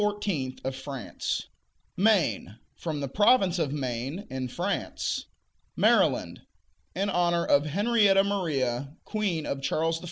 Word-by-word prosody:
of 130 0 -3
France. 135 -1 -4 0.5
Maine 165 - +2 0.2
From 155 -4 -4
the 140 - -2
province 195 - +3
of 150 -4 0
Maine, 135 - -3
in 130 -1 -3
France. 180 +10 -2 0.5
Maryland - - +2 0.5
In 200 - 0
honor 175 -1 +2
of 145 +1 +3
Henrietta 200 +2 +4
Maria, 145 -9 -1
queen 195 -8 -1
of 135 - -3
Charles 165 +4 0
I. - - -9
160 Hz, 120 wpm, -27 LUFS, 135-195 Hz, 0.5 s, Henrietta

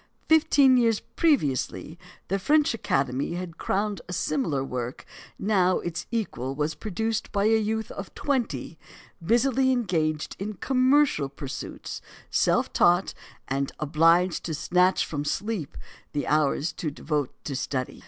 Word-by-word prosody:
Fifteen 285 -4 +5
years 230 -3 +3
previously, 170 - 0 0.3
the 195 - 0
French 300 +6 +3
Academy 135 - -1
had 175 -2 -6
crowned 205 +1 -1
a - - -4
similar 145 -4 0
work; 125 -1 -5 0.3
now 185 -3 +2
its 175 -1 -5
equal 135 - -3
was 150 +2 -1
produced 220 +2 -3
by 200 -1 +1
a 220 +1 +4
youth 220 0 -2
of 195 - -7
twenty, 225 - -2 0.4
busily 260 +6 +3
engaged 165 - 0
in 210 +2 -4
commercial 260 - +2
pursuits, 140 -1 -7 0.3
self - - +2
taught, 175 +2 +3 0.3
and 135 +1 -2
obliged 165 +4 +3
to 160 - -2
snatch 180 +4 +2
from 145 -2 -3
sleep 200 0 -3 0.4
the 145 - -1
hours 150 +1 +1
devoted 150 -2 -2
to 140 - -4
study. 130 -1 -3
180 Hz, 130 wpm, -26 LUFS, 150-225 Hz, 0.4 s, Fifteen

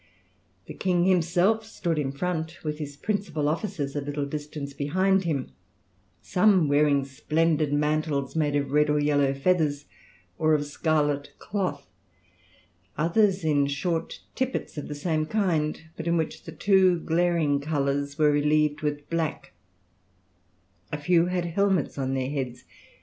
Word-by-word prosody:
The - - -8
king 180 -2 +1
himself 185 +4 +2
stood 175 -7 -2
in 135 -2 -1
front 160 +2 -3
with 150 -1 -3
his 145 -2 -6
principal 195 -5 -2
officers 155 -3 -2
a 145 - -1
little 145 0 -3
distance 145 -1 -6
behind 185 +7 +1
him; 145 -6 -2 0.7
some 185 -4 +3
wearing 145 -1 +3
splendid 155 +2 0
mantles 150 -1 0
made 150 -2 +1
of 140 -1 -1
red 150 +1 +3
or 150 - +2
yellow 145 -2 +2
feathers, 145 -1 +1 0.5
or 155 0 +4
of 145 -1 -1
scarlet 145 -1 0
cloth; 185 -8 -3 1.1
others 185 +4 +2
in 145 -3 +2
short 160 +4 -2
tippets 260 -1 -3
of 150 - -5
the 150 - -5
same 155 +1 -1
kind, 165 -7 0
but 160 - -6
in 170 0 +2
which 160 -1 -3
the 165 - -7
two 185 +1 +3
glaring 165 -3 +1
colours 140 -1 -1
were 150 -2 +4
relieved 150 0 +2
with 145 -1 -3
black; 165 -2 -2 1.4
a 150 - -2
few 170 +3 +3
had 180 -1 -1
helmets 185 -4 0
on 135 0 -1
their 130 +1 -2
heads. 125 -4 -4
155 Hz, 145 wpm, -26 LUFS, 145-175 Hz, 1.4 s, or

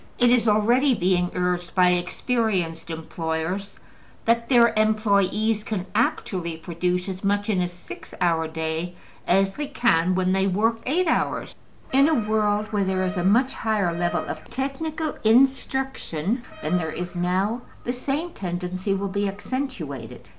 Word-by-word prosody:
It 245 -1 +4
is 240 -2 +3
already 240 +6 +4
being 180 -2 +1
urged 180 -1 -1
by 180 -1 +5
experienced 180 -2 -1
employers 160 +4 -4 0.5
that 230 0 +2
their 235 -3 +5
employes 215 0 +2
can 205 -5 -3
actually 180 -6 -1
produce 180 +2 -2
as 190 0 -5
much 205 +2 +1
in 190 -3 +1
a 180 - +1
six 175 0 -11
hour 165 -2 +2
day 160 +2 -3 0.3
as 195 +1 +3
they 295 +4 -4
can 185 - +2
when 185 0 +1
they 190 +1 +2
work 225 +4 +1
eight 345 +7 +2
hours. - - 0 0.4
In 275 +2 +5
a 320 - +3
world 210 -1 +1
where 205 -2 +1
there 190 0 0
is 185 +2 -2
a 175 - 0
much 240 +8 +3
higher 210 -6 0
level 175 +1 -1
of - - -7
technical 300 +4 -3
instruction 255 - +1 0.2
than 175 +4 +1
there 160 -2 -2
is 180 +2 -5
now 190 +7 0 0.2
the 245 - -2
same 285 +7 -2
tendency 185 - -3
will 200 +1 -2
be 200 +1 -1
accentuated. 195 - -5
200 Hz, 155 wpm, -24 LUFS, 180-235 Hz, 0.5 s, by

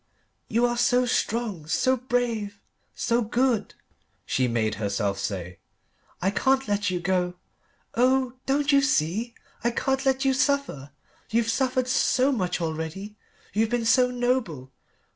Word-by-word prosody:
"You 235 +2 +2
are 240 0 0
so 250 +1 +3
strong, 220 -9 -1
so 260 +10 +2
brave, 235 -5 -2 0.4
so 235 0 +1
good," 240 +1 0 0.5
she 130 -1 +1
made 110 -2 0
herself 100 -1 -1
say. 90 -3 -4 0.6
"I 190 - +2
can't 265 +4 +1
let 205 -1 0
you 180 -1 -1
go. 180 0 0 0.6
Oh 255 +1 +2
don't 285 +2 +2
you 280 0 +5
see 230 - 0 0.3
I 235 - +3
can't 270 +3 -1
let 270 0 +1
you 270 - +4
suffer. 280 - 0 0.4
You've 230 0 +1
suffered 255 0 0
so 260 0 +2
much 185 -9 -1
already 165 +5 -4 0.4
you've 220 +1 +1
been 240 -1 -1
so 250 +2 +4
noble. 245 - -1
230 Hz, 140 wpm, -25 LUFS, 180-255 Hz, 0.6 s, you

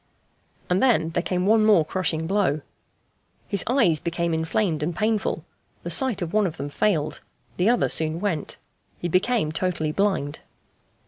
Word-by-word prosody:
And 180 +1 +1
then 230 -11 +3
there 175 - 0
came 180 0 -1
one 220 +1 +4
more 205 -7 +5
crushing 160 -2 -1
blow. 175 -5 +1 0.9
His 200 -2 0
eyes 225 - +3
became 170 0 -2
inflamed 160 +1 0
and 160 +3 -2
painful 215 +2 -1 0.4
the - - -4
sight 255 -8 +2
of 165 - -6
one 210 -2 +3
of 165 -2 -7
them 140 +1 -4
failed, 155 -1 0 0.4
the 180 +5 +3
other 245 - +2
soon 160 +1 +2
went; 175 -7 -3 0.4
he 175 - -3
became 185 0 +1
totally 160 -2 -1
blind. 185 -6 -1
180 Hz, 155 wpm, -24 LUFS, 160-210 Hz, 0.9 s, more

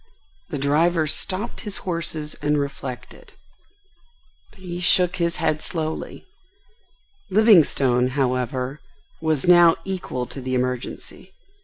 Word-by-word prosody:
The 155 - -3
driver 155 +4 +2
stopped 185 +8 -1
his 210 -4 -5
horses 165 -4 -3
and 150 0 +1
reflected. 140 -3 -6 1.2
He 180 -2 -7
shook 180 0 +3
his 170 -1 0
head 155 -1 0
slowly. 160 -2 -4 1.0
Livingstone, 160 - +4
however, 130 +1 -1 0.4
was 160 -3 0
now 175 -2 +7
equal 180 -10 -4
to 135 - -9
the 130 0 -2
emergency. 125 -1 -4
155 Hz, 105 wpm, -22 LUFS, 135-175 Hz, 1.2 s, now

